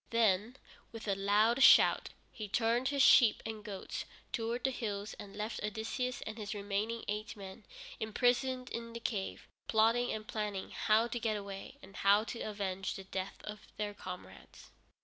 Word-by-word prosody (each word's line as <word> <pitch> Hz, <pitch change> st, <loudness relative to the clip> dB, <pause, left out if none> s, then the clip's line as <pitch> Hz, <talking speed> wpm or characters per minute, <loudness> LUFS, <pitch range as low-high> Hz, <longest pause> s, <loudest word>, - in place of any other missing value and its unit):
Then, 225 Hz, +1 st, +2 dB, 0.3 s
with 225 Hz, -1 st, -8 dB
a 200 Hz, -, +2 dB
loud 210 Hz, +5 st, +3 dB
shout, -, -, +7 dB, 0.2 s
he 215 Hz, -3 st, -6 dB
turned 235 Hz, +4 st, +2 dB
his 280 Hz, -1 st, +3 dB
sheep 230 Hz, -4 st, +7 dB
and 220 Hz, -1 st, -5 dB
goats 200 Hz, -3 st, -5 dB, 0.3 s
towards 235 Hz, +1 st, -2 dB
the 265 Hz, -, +2 dB
hills 210 Hz, -4 st, -4 dB
and 200 Hz, -1 st, -9 dB
left 215 Hz, +2 st, -3 dB
Odysseus 225 Hz, +4 st, -2 dB
and 215 Hz, +1 st, -6 dB
his 210 Hz, 0 st, -4 dB
remaining 205 Hz, +3 st, -2 dB
eight 210 Hz, +2 st, -3 dB
men 195 Hz, +1 st, -9 dB, 0.3 s
imprisoned 250 Hz, +3 st, +1 dB
in 230 Hz, 0 st, -5 dB
the 235 Hz, -, -5 dB
cave, 205 Hz, -4 st, -3 dB, 0.2 s
plotting 230 Hz, +2 st, +3 dB
and 215 Hz, 0 st, -4 dB
planning 210 Hz, -3 st, -3 dB
how 215 Hz, +1 st, +3 dB
to 240 Hz, +1 st, -3 dB
get 220 Hz, -2 st, 0 dB
away, 200 Hz, +6 st, -7 dB
and 195 Hz, 0 st, -12 dB
how 200 Hz, +2 st, +5 dB
to 230 Hz, +1 st, -6 dB
avenge 195 Hz, -3 st, -3 dB
the 195 Hz, -, -7 dB
death 190 Hz, 0 st, -5 dB
of 210 Hz, 0 st, -8 dB
their 210 Hz, -1 st, -2 dB
comrades. 185 Hz, -2 st, -10 dB
215 Hz, 170 wpm, -34 LUFS, 200-230 Hz, 0.3 s, shout